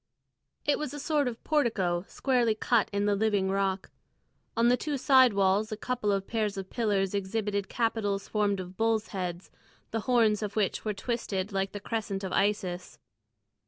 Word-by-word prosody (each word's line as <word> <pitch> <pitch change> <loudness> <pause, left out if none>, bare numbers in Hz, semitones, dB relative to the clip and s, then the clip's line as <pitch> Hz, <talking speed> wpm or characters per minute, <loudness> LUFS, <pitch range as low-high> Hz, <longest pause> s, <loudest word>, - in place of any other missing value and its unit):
It 290 - +2
was 295 -2 -4
a - - -6
sort 295 -1 +1
of 235 -1 -5
portico 200 - +1
squarely 245 -5 +1
cut 225 0 +2
in 200 0 0
the 205 - +3
living 200 -2 +1
rock. 195 -1 -1 0.7
On 230 +1 +4
the 245 - +5
two 290 +2 -3
side 260 -3 +5
walls 200 +3 +2
a 215 - -3
couple 230 -2 -1
of 195 -1 0
pairs 215 -3 -1
of 190 -1 -6
pillars 205 -5 0
exhibited 200 0 -2
capitals 220 -4 -1
formed 205 -2 0
of 185 0 -8
bulls' 225 -1 +1
heads, 180 -2 -5 0.4
the 225 - -1
horns 225 -4 +4
of 205 -1 -4
which 210 -3 0
were 215 -2 -2
twisted 205 -3 -3
like 195 0 -1
the 205 - -6
crescent 205 -2 -3
of 190 - -3
Isis. 185 -3 -1
210 Hz, 175 wpm, -29 LUFS, 195-230 Hz, 0.7 s, the